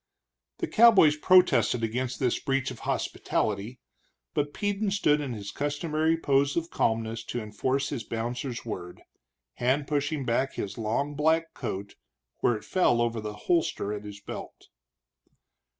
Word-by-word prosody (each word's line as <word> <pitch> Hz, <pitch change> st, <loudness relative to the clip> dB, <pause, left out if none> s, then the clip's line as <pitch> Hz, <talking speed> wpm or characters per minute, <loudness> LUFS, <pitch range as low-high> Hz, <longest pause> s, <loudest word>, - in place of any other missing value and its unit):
The 345 Hz, -, -2 dB
cowboys 215 Hz, -, +6 dB
protested 180 Hz, -7 st, +4 dB
against 125 Hz, +3 st, -2 dB
this 125 Hz, -3 st, +1 dB
breach 135 Hz, -1 st, -1 dB
of -, -, -9 dB
hospitality, 105 Hz, +4 st, -1 dB, 0.5 s
but 145 Hz, 0 st, 0 dB
Peden 205 Hz, +4 st, -1 dB
stood 150 Hz, -7 st, +2 dB
in 135 Hz, -4 st, -3 dB
his 100 Hz, -2 st, -6 dB
customary 155 Hz, +2 st, 0 dB
pose 140 Hz, -1 st, +2 dB
of 165 Hz, 0 st, -2 dB
calmness 115 Hz, 0 st, 0 dB
to 120 Hz, -, -3 dB
enforce 130 Hz, +6 st, -1 dB
his 130 Hz, -6 st, -4 dB
bouncer's 120 Hz, +2 st, -4 dB
word, 90 Hz, -6 st, -7 dB, 0.5 s
hand 130 Hz, +4 st, +1 dB
pushing 145 Hz, -1 st, -1 dB
back 130 Hz, +3 st, 0 dB
his 100 Hz, -, -4 dB
long 115 Hz, +7 st, -1 dB
black 160 Hz, +3 st, +1 dB
coat 100 Hz, -5 st, -5 dB, 0.5 s
where 120 Hz, -, +2 dB
it 105 Hz, -, -8 dB
fell 150 Hz, -10 st, +2 dB
over 115 Hz, -1 st, 0 dB
the 105 Hz, -1 st, -5 dB
holster 160 Hz, -, +1 dB
at 105 Hz, 0 st, -5 dB
his 105 Hz, -1 st, -9 dB
belt. 100 Hz, -, -9 dB
130 Hz, 145 wpm, -28 LUFS, 115-150 Hz, 0.5 s, cowboys